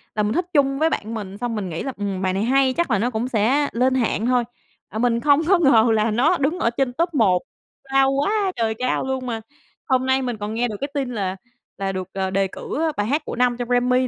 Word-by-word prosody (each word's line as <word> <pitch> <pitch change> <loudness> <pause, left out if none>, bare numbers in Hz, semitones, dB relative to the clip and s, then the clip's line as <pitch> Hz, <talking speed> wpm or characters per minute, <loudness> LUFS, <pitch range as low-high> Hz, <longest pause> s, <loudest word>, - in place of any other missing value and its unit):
là 210 - +1
mình 210 +2 0
thích 355 0 0
chung 275 -1 +2
với 320 +1 +3
bạn 220 -4 -3
mình 200 -3 -6
xong 235 0 -3
mình 195 -4 -3
nghĩ 160 - -4
là, 270 - -4
ừm, 200 -2 -3
bài 185 -1 0
này 195 +3 0
hay, 265 +1 +3
chắc 340 -5 -1
là 200 - +3
nó 240 +3 +1
cũng 235 +1 -2
sẽ 260 +6 +2
lên 255 +2 +1
hạng 230 -3 0
thôi. 250 -1 +2 0.5
À, 220 - -5
mình 235 -1 +2
không 285 +3 +4
có 380 -2 +5
ngờ 240 -8 +5
là 215 0 +2
nó 285 +11 +3
đứng 305 +6 0
ở 230 - +2
trên 245 +1 -1
top 335 +4 -1
1 195 -9 +3 0.4
cao 270 0 +2
quá 385 +8 +1
trời 225 -1 0
cao 255 0 0
luôn 265 -1 -3
mà, 225 -2 -3 0.5
hôm 260 -1 +2
nay 265 0 +2
mình 245 -3 -3
còn 210 +1 -4
nghe 240 +2 0
được 210 -3 -5
cái 280 - -1
tin 275 -3 -2
là 195 -4 -2 0.4
là 195 -1 -2
được, 185 -1 -4
à, 190 -1 -1
đề 195 0 +1
cử, - - -7
ơ, 320 0 +1
bài 205 +1 0
hát 295 +4 +1
của - - -5
năm 245 0 +2
trong 245 0 -4
Grammy 250 +1 +2
245 Hz, 265 wpm, -22 LUFS, 215-270 Hz, 0.5 s, có